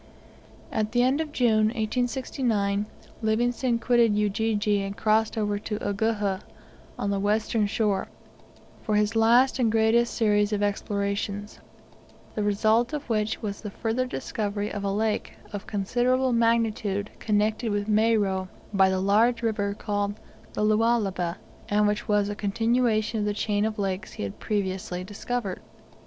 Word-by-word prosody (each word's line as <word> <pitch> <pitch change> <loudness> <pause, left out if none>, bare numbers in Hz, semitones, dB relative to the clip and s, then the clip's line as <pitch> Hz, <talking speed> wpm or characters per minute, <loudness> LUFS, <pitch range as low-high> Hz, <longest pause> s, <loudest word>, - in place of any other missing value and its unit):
At 215 0 -1
the 245 0 +4
end 265 +5 +2
of 310 -2 -4
June, 220 -6 +3
1869, 220 -3 -1 0.3
Livingstone 240 +2 +1
quitted 235 -2 +3
Ujiji 210 0 +1
and 195 0 -5
crossed 220 +1 +2
over 205 -1 0
to 210 0 -4
Uguhha, 205 -2 -1 0.6
on 200 - -1
the 200 - 0
western 210 +1 +1
shore, 200 -2 0 0.7
for 215 - -1
his 210 +1 +1
last 240 +4 +4
and 230 -3 +3
greatest 225 +2 +3
series 210 -2 +2
of 205 -1 0
explorations; 200 0 -2 0.7
the 215 - -2
result 220 +5 +2
of 295 -1 -4
which 215 0 -1
was 200 -1 -4
the 210 - -5
further 230 +5 -2
discovery 205 - -3
of 205 - -4
a 200 - 0
lake 215 +1 -1 0.2
of 205 - -6
considerable 245 +5 +1
magnitude 225 -3 +1
connected 215 +2 0
with 205 0 -1
Moero 210 -3 +2 0.3
by 190 -1 +5
the 190 0 0
large 225 +5 +3
river 205 -3 0
called 205 -1 -2 0.4
the - - -1
Lualaba, 210 -5 +1 0.3
and 210 0 +3
which 210 0 0
was 205 -1 +2
a 205 - -2
continuation 225 +2 +1
of 210 - 0
the 205 - -1
chain 205 0 0
of 220 0 -2
lakes 190 -1 -3
he - - -5
had 100 -1 -6
previously 190 -3 -2
discovered. 205 0 -4
210 Hz, 145 wpm, -26 LUFS, 205-230 Hz, 0.7 s, by